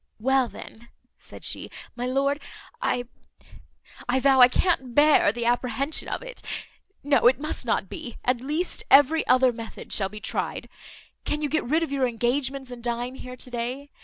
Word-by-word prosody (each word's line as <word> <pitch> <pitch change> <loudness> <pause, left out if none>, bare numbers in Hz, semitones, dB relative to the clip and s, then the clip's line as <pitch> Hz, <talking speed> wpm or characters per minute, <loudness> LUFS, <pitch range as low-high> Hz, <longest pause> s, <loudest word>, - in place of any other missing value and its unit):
"Well, 265 +2 +2
then," 235 0 -12 0.3
said - - -12
she, - - -3 0.3
"my 245 +1 -3
lord, 275 +3 0 0.4
I 250 - 0 1.1
I 260 +2 +3
vow, 265 0 +5
I 245 - +11
can't 260 -3 0
bear 295 -7 +5
the 235 +1 -4
apprehension 250 +4 0
of - - -4
it. - - -8 0.6
No, 280 -3 +4
it 255 +2 +4
must 305 -4 -4
not 195 - +1
be. 235 +5 -8
At 245 -1 +1
least 305 +7 -2
every 290 +4 +5
other 255 0 +4
method 230 -1 -8
shall 195 -2 +2
be 210 +2 -9
tried. 220 - -3 0.5
Can 300 0 -2
you 295 - 0
get 315 +1 0
rid 315 +7 +1
of 320 - -4
your 270 -2 +1
engagements, 255 +3 -1
and 240 -1 -9
dine 240 +1 -2
here 255 -1 -9
to 250 0 -4
day? 250 +4 -4
255 Hz, 175 wpm, -25 LUFS, 240-285 Hz, 1.1 s, I